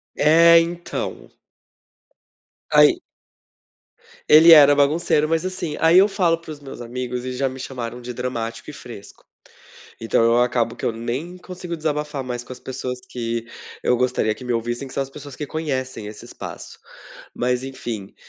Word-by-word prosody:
É, 165 +2 +6
então. 170 +1 -4 1.4
Aí 355 -2 +6 1.3
Ele 160 +2 +8
era 145 -2 +9
bagunceiro, 150 +1 +2
mas, 165 +2 0
assim, 175 -5 -4
aí 165 +3 +6
eu 200 - +6
falo 170 -5 +1
para 165 - -15
os 145 - -9
meus 135 -3 -10
amigos 125 +1 -5
e 130 - -4
já 135 +1 0
me 130 0 -7
chamaram 125 -2 -6
de 125 +1 -6
dramático 120 0 -5
e - - -15
fresco. 115 -7 -12 0.8
Então 115 0 +1
eu 115 +1 +4
acabo 120 -1 0
que - - -12
eu - - +1
nem 125 +11 -5
consigo 180 -2 -7
desabafar 150 -2 -2
mais 120 -1 -4
com 130 - -12
as 125 - -9
pessoas 125 -1 -5
que 115 -1 -3 0.4
eu 125 - +2
gostaria 125 -3 0
que 130 - -12
me 125 - -3
ouvissem, 120 +3 -2
que - - -11
são 140 - -1
as 135 - -11
pessoas 145 -2 -11
que 150 - -5
conhecem 130 -8 -4
esse 105 - -10
espaço, - - -9 0.6
mas 125 +1 -1
enfim, 115 -7 -6
130 Hz, 165 wpm, -22 LUFS, 120-155 Hz, 1.4 s, era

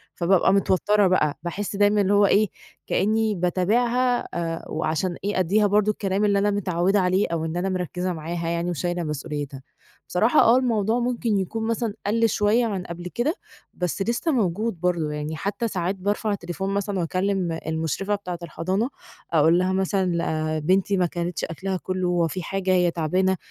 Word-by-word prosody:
فبابقى 185 +2 +3
متوتّرة 200 +1 +3
بقى، 155 -5 +2
باحس 200 +4 -4
دايمًا 205 +1 +3
اللي 200 0 +2
هو 205 0 +5
إيه، 210 +2 +4 0.4
كأنّي 215 +1 +1
باتابعها، 235 +8 +1
آآ 165 -1 -3
وعشان 160 +3 -1
إيه 205 -1 0
أدّيها 205 +4 +3
برضه 210 +1 +3
الكلام 200 0 -1
اللي 200 -1 +3
أنا 205 +1 +2
متعودة 195 0 +1
عليه، 185 +2 +2
أو 165 -1 -2
إن 160 +2 -3
أنا 185 +2 -1
مركّزة 180 0 -2
معاها 165 +1 -4
يعني، 170 +1 -1
وشايلة 175 0 -2
مسؤوليتها. 145 -2 -5 0.5
بصراحة 225 +11 +4
آه، 230 +2 +6
الموضوع 230 -2 +1
ممكن 235 -3 0
يكون 220 +4 -3
مثلًا 230 -2 -1
قل 230 +2 +2
شوية 215 +4 +2
عن 195 -5 -2
قبل 175 0 -7
كده، 290 +9 0 0.4
بس 180 +2 -3
لسه 235 - 0
موجود 215 - 0
برضه 170 -4 0
يعني، 150 +1 -4
حتى 200 +7 -2
ساعات 185 -2 -2
بارفع 205 +3 -1
التليفون 190 0 -3
مثلًا، 200 -1 -1
وأكلّم 185 -1 -1
المشرفة 160 +6 -1
بتاعة 180 -4 -6
الحضانة، 185 - -1 0.4
أقول 165 +2 +5
لها 185 +1 +1
مثلًا 190 -3 0 0.3
آآ - - -1
"بنتي 190 +5 +2
ما 180 - +3
كلِتش 175 0 -3
أكلها 185 +3 -3
كلّه، 185 0 -2
هو 175 -2 +2
فيه 185 +4 -4
حاجة، 190 +1 -2
هي 180 -1 +3
تعبانة؟ 185 +3 +1
190 Hz, 170 wpm, -24 LUFS, 170-205 Hz, 0.5 s, آه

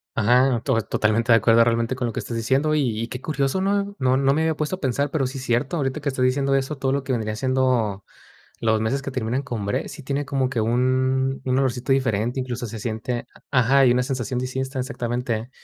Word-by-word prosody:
Ajá, 125 +3 +3
to 120 -5 +2
totalmente 110 +3 +1
de 115 - +8
acuerdo 115 +1 +5
realmente 115 +2 0
con 125 -1 -2
lo 115 - -4
que - - -3
estás 115 - -5
diciendo. 135 +7 +1
Y 120 -7 0
y 115 - -3
qué 125 +1 -7
curioso, 140 +3 -1
¿no? 200 +1 0
No 130 0 +2
no 135 0 +3
me 155 - +1
había 160 0 +1
puesto 155 +4 -1
a - - -21
pensar, 140 +2 0
pero 135 -4 0
sí 135 - -6
cierto, 130 +6 0
ahorita 135 +1 -2
que 140 - -1
estás 130 -2 0
diciendo 135 +1 +2
eso, 135 +2 -1
todo 135 0 0
lo 140 0 0
que 135 - -4
vendría 110 -2 -2
siendo 125 -6 0 0.6
los 110 -1 +2
meses 135 +5 -1
que 140 - -4
terminan 130 +1 -2
con 115 -7 -4
bre, 100 - -1
sí 145 - -9
tiene 140 +2 -1
como 135 -1 0
que 125 -4 -2
un 130 +3 +1
un 130 0 +1
olorcito 130 -1 0
diferente, 120 -2 0
incluso 125 -1 -4
se 110 +1 -7
siente 115 +2 -3 0.2
a 135 - +2
ajá, 135 +3 +4
y - - +5
una 125 +1 +2
sensación 125 -2 -2
distinta, 130 +1 -3
exactamente. 120 -2 -3
130 Hz, 230 wpm, -23 LUFS, 115-135 Hz, 0.6 s, de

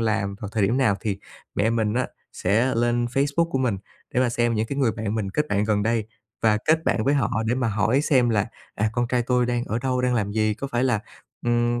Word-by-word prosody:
làm 110 -3 0
vào 105 - -4
thời 110 -2 +1
điểm 110 +6 +2
nào, 110 -7 +3
thì 100 -3 -2 0.4
mẹ 110 +3 +2
mình 110 -2 0
á 125 0 +1 0.3
sẽ 115 +8 +1
lên 120 +1 +1
Facebook 145 +6 +1
của 135 - 0
mình 120 -7 0 0.4
để 125 - +3
mà 130 - +3
xem 120 0 +1
những 110 +1 0
cái 140 +4 -4
người 125 -5 +2
bạn 105 +1 -3
mình 105 -3 -2
kết 150 +8 -1
bạn 105 0 +1
gần 105 -1 +1
đây 110 0 0 0.4
và 110 -1 +4
kết 160 +1 +3
bạn 110 - +1
với 140 - +3
họ 140 - +1 0.2
để 120 - +2
mà 125 -3 0
hỏi 110 +5 +2
xem 130 -5 +3
là, 105 -3 +1 0.3
à: 110 +1 0
"Con 120 0 0
trai 125 0 +1
tôi 125 0 +1
đang 120 0 -1
ở 110 0 -2
đâu, 125 0 0
đang 125 0 +1
làm 100 -3 0
gì, 110 0 +1
có 125 +6 -5
phải 125 -1 0
là, 120 -5 +2 0.5
ừm, 120 0 +2
120 Hz, 255 wpm, -24 LUFS, 110-125 Hz, 0.5 s, và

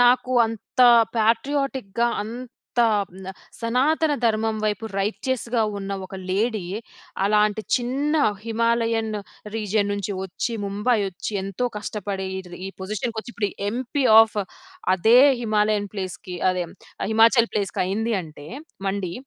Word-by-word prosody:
నాకు 250 +1 +4
అంత 225 +3 -5 0.4
పాట్రియాటిక్‌గా 240 -1 +1 0.2
అంత 240 +3 -7 0.6
హ్మ్, 190 +1 -12
ఆహ్, - - -11 0.3
సనాతన 290 +7 +2
ధర్మం 220 0 +1
వైపు 215 +1 -1 0.2
రైటియస్‌గా 235 +3 -1 0.2
ఉన్న 195 0 -6 0.2
ఒక 190 - -11 0.2
లేడీ. 215 +1 0 0.6
అలాంటి 210 +1 +2
చిన్న 270 +5 0 0.3
హిమాలయన్ 230 -1 +1 0.4
రీజియన్ 210 -1 0
నుంచి 200 0 -3
వచ్చి, 190 +5 -3
ముంబై 210 +5 +1
వచ్చి 190 +3 -6
ఎంతో 195 +6 -2
కష్టపడి, 200 -2 -4
ఈటిది 180 -1 -8
ఈ - - -4
పొజిషన్‌కొచ్చి, 220 +4 -4
ఇప్పుడు 205 -2 -1 0.2
ఎంపీ 255 +4 -2 0.2
ఆఫ్ 220 -1 +2 0.6
అదే 220 +7 +5 0.2
హిమాలయన్ 210 -2 +1
ప్లేస్‌కి 185 -2 -5 0.2
అదే, 180 -1 -2
హ్మ్, - - -15 0.4
హిమాచల్ 230 +1 +5
ప్లేస్‌కి 200 -2 -1
అయింది. 220 +5 -1
అంటే, 150 -2 -12 0.4
మండి 190 -3 -2
220 Hz, 120 wpm, -23 LUFS, 200-235 Hz, 0.6 s, అదే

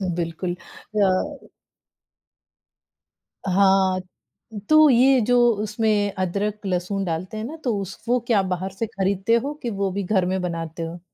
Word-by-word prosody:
बिल्कुल। 175 +1 -3 0.5
अ 195 +10 -1 2.0
हाँ, 190 0 +3 0.7
तो 310 -1 +7
ये 260 +1 +5
जो 245 0 +3 0.3
उसमें 210 -2 0
अदरक 200 +3 -2
लहसुन 190 +2 -1
डालते 180 +5 -4
हैं 215 - -4
ना 300 - -6
तो 240 -5 0
उस 195 +1 -7
वो 245 +1 +3
क्या 215 -5 +3
बाहर 185 +1 -3
से 225 +4 -2
खरीदते 195 +1 0
हो, 280 +5 -1
कि 250 -5 -5
वो 200 -2 -2
भी 200 +1 -3
घर 190 -1 +1
में 185 0 -1
बनाते 165 -1 -4
हो? 165 +1 -6
195 Hz, 145 wpm, -23 LUFS, 185-225 Hz, 2.0 s, तो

